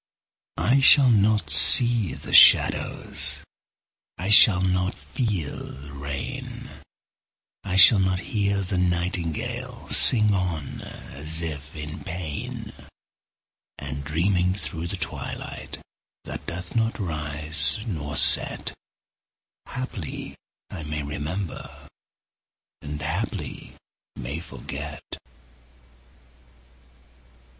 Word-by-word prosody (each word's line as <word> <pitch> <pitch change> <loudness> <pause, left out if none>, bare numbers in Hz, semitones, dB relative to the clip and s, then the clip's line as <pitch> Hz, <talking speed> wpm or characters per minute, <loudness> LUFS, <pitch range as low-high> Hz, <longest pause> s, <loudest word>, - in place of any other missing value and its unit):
I 120 +12 +3
shall 135 -1 +7
not 105 -6 +2
see 115 - +5
the - - -9
shadows, - - +4 0.7
I 95 +5 -2
shall 95 -3 +8
not 95 +1 0
feel 105 - -3 0.2
the 70 +1 -11
rain; 70 0 -6 0.9
I 95 -2 -3
shall 95 +3 +8
not 95 -1 +1
hear 100 -2 +1
the 90 0 -2
nightingale 90 -2 -2
Sing 105 -3 +5
on, 90 -6 -3
as 80 +3 -7
if 75 -1 -6
in 75 0 -7
pain; 90 -5 -6 1.0
And 70 0 -6
dreaming 90 +5 +1
through 85 -4 -6
the 95 +2 -5
twilight - - -6 0.5
That - - -6
doth 90 +3 -6
not 115 0 +1
rise 75 -4 -3
nor 75 -9 -4
set, - - +1 0.9
Haply 105 - -6 0.4
I - - -6
may 75 0 -4
remember, 75 +6 -6 0.9
And 75 0 -6
haply 80 +2 -4 0.4
may 70 +6 -5
forget. 85 - -8
85 Hz, 95 wpm, -24 LUFS, 75-100 Hz, 1.0 s, shall